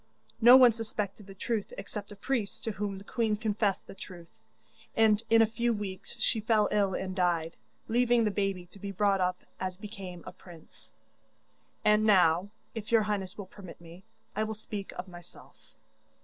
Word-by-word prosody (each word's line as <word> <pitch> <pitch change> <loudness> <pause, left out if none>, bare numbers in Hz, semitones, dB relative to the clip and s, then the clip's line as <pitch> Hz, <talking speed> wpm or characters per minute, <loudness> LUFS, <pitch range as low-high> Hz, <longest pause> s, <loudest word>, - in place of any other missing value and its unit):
No 240 +3 +10
one 250 -2 +8
suspected 210 -3 -5
the 195 - -11
truth 215 +1 -3
except 205 +1 -7
a - - -8
priest 215 0 -2
to 225 - -1
whom 200 -1 -3
the 195 - -10
queen 220 0 0
confessed 210 -2 0
the - - -10
truth, 175 -3 -11 0.7
and 220 -1 +5
in 225 0 +7
a - - +5
few 235 +2 0
weeks 205 +1 -6
she 220 +1 +1
fell 215 -1 +3
ill 200 -3 +2
and 185 -1 -4
died, 170 -3 0 0.3
leaving 240 0 +3
the 210 - +1
baby 195 -3 -1
to 200 - -13
be 200 +1 -5
brought 195 0 +2
up 180 0 -1 0.2
as 185 -1 -3
became 195 -4 -8
a - - -7
prince. 170 -3 -16 0.9
And 210 0 +5
now, 185 -3 +4 0.2
if 225 -2 -6
your 225 -2 +5
highness 200 -3 -3
will 205 - -6
permit 190 -1 -12
me, 170 +2 -13 0.3
I 215 - +1
will 220 0 -3
speak 205 -2 -6
of 185 - -6
myself. 175 -1 -15
205 Hz, 180 wpm, -30 LUFS, 185-220 Hz, 0.9 s, No